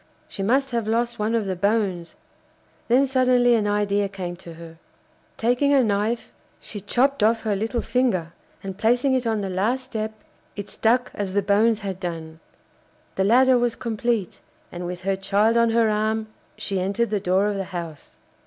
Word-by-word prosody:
She -, -, -7 dB
must 265 Hz, +6 st, +1 dB
have 230 Hz, -3 st, -1 dB
lost 235 Hz, +1 st, 0 dB
one 215 Hz, +2 st, 0 dB
of 225 Hz, -3 st, 0 dB
the 190 Hz, -1 st, -2 dB
bones. 195 Hz, -3 st, -1 dB, 0.7 s
Then 255 Hz, +4 st, +4 dB
suddenly 250 Hz, -2 st, +3 dB
an 215 Hz, -3 st, +2 dB
idea 205 Hz, -1 st, +1 dB
came 185 Hz, -3 st, -5 dB
to 170 Hz, -2 st, -11 dB
her. 165 Hz, 0 st, -12 dB, 0.6 s
Taking 250 Hz, +5 st, +2 dB
a 265 Hz, -, +5 dB
knife 215 Hz, +2 st, -1 dB, 0.3 s
she 205 Hz, -, -8 dB
chopped 255 Hz, +6 st, +1 dB
off 225 Hz, +2 st, +3 dB
her 210 Hz, -2 st, 0 dB
little 225 Hz, +4 st, -1 dB
finger, 190 Hz, -10 st, 0 dB, 0.3 s
and 195 Hz, 0 st, -7 dB
placing 245 Hz, +5 st, +2 dB
it 255 Hz, -2 st, 0 dB
on 220 Hz, -2 st, 0 dB
the 195 Hz, -, -3 dB
last 220 Hz, +8 st, 0 dB
step, 220 Hz, -4 st, -4 dB, 0.4 s
it 205 Hz, -, -7 dB
stuck 245 Hz, +3 st, +1 dB
as 195 Hz, -2 st, -4 dB
the 200 Hz, 0 st, +1 dB
bones 210 Hz, +2 st, +2 dB
had 190 Hz, -2 st, -5 dB
done. 165 Hz, -3 st, -6 dB, 0.7 s
The 190 Hz, -, 0 dB
ladder 255 Hz, +4 st, +5 dB
was 240 Hz, -1 st, 0 dB
complete, 230 Hz, -4 st, -2 dB, 0.3 s
and 175 Hz, 0 st, -5 dB
with 180 Hz, 0 st, -6 dB
her 195 Hz, +1 st, 0 dB
child 200 Hz, +4 st, +2 dB
on 235 Hz, 0 st, +4 dB
her 225 Hz, 0 st, +3 dB
arm 215 Hz, +1 st, -1 dB, 0.3 s
she 195 Hz, -2 st, -2 dB
entered 200 Hz, +5 st, -1 dB
the 210 Hz, -, +1 dB
door 185 Hz, +2 st, +2 dB
of 210 Hz, -1 st, 0 dB
the 195 Hz, -, -3 dB
house. 170 Hz, -5 st, -8 dB
215 Hz, 180 wpm, -23 LUFS, 195-235 Hz, 0.7 s, a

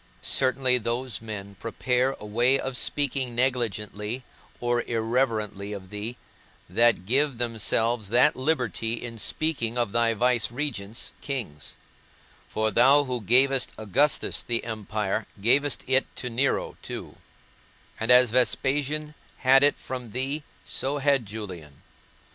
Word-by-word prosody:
Certainly 130 Hz, -1 st, +2 dB
those 120 Hz, +1 st, -3 dB
men 100 Hz, -3 st, -7 dB
prepare 125 Hz, +3 st, 0 dB
a -, -, -9 dB
way 120 Hz, +6 st, +3 dB
of 130 Hz, -1 st, -3 dB
speaking 130 Hz, -1 st, -1 dB
negligently 120 Hz, -2 st, -1 dB, 0.4 s
or 120 Hz, 0 st, +1 dB
irreverently 110 Hz, -3 st, -1 dB
of 95 Hz, -2 st, -9 dB
thee, 105 Hz, +4 st, -5 dB, 0.5 s
that 110 Hz, 0 st, +3 dB
give 135 Hz, +4 st, +1 dB
themselves 115 Hz, -1 st, 0 dB
that 125 Hz, +6 st, +4 dB
liberty 125 Hz, -, -1 dB
in 115 Hz, -1 st, -7 dB
speaking 125 Hz, -3 st, -1 dB
of 120 Hz, -4 st, 0 dB
thy 115 Hz, 0 st, +2 dB
vicegerents, 120 Hz, -1 st, -1 dB
kings; 115 Hz, -, -5 dB, 0.7 s
for 110 Hz, 0 st, 0 dB
thou 135 Hz, +7 st, +5 dB
who 125 Hz, -3 st, -3 dB
gavest 130 Hz, +5 st, +3 dB
Augustus 135 Hz, +8 st, +1 dB
the 115 Hz, -1 st, -2 dB
empire, 110 Hz, -2 st, -3 dB
gavest 135 Hz, +7 st, +2 dB
it 130 Hz, +1 st, +2 dB
to 125 Hz, -, -5 dB
Nero 135 Hz, +4 st, 0 dB
too; -, -, -7 dB, 0.8 s
and 110 Hz, -, -2 dB
as 125 Hz, -2 st, +7 dB
Vespasian 145 Hz, +4 st, +1 dB, 0.2 s
had 135 Hz, 0 st, +5 dB
it 145 Hz, 0 st, +4 dB
from 125 Hz, -4 st, -7 dB
thee, 135 Hz, +4 st, -1 dB, 0.2 s
so 140 Hz, +2 st, -1 dB
had 135 Hz, -5 st, +2 dB
Julian. 90 Hz, -9 st, -8 dB
120 Hz, 125 wpm, -26 LUFS, 110-130 Hz, 0.8 s, as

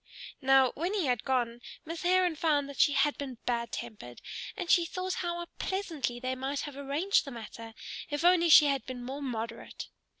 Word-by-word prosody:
Now 265 Hz, -1 st, +5 dB
when 350 Hz, +7 st, -2 dB
he 385 Hz, -6 st, +1 dB
had 245 Hz, -3 st, 0 dB
gone 240 Hz, -2 st, 0 dB, 0.2 s
Miss 330 Hz, +1 st, -5 dB
Heron 360 Hz, -1 st, +3 dB
found 295 Hz, -3 st, +1 dB
that 280 Hz, -, -9 dB
she 290 Hz, -, +5 dB
had 285 Hz, +1 st, +2 dB
been 265 Hz, -4 st, -5 dB
bad 235 Hz, -1 st, -1 dB
tempered, 210 Hz, -, -7 dB, 0.4 s
and 355 Hz, -, -3 dB
she 345 Hz, -, +6 dB
thought 365 Hz, +2 st, -3 dB
how 345 Hz, -1 st, -2 dB
pleasantly 320 Hz, -11 st, -2 dB
they 255 Hz, +1 st, -2 dB
might 270 Hz, +2 st, -2 dB
have 290 Hz, -2 st, -6 dB
arranged 285 Hz, +8 st, +1 dB
the -, -, -7 dB
matter 230 Hz, -2 st, -9 dB, 0.3 s
if 295 Hz, +2 st, -2 dB
only 350 Hz, -1 st, +5 dB
she 305 Hz, -1 st, +9 dB
had 275 Hz, -2 st, +1 dB
been 250 Hz, -1 st, -6 dB
more 270 Hz, +4 st, -5 dB
moderate. 230 Hz, -4 st, -5 dB
280 Hz, 190 wpm, -30 LUFS, 250-335 Hz, 0.4 s, she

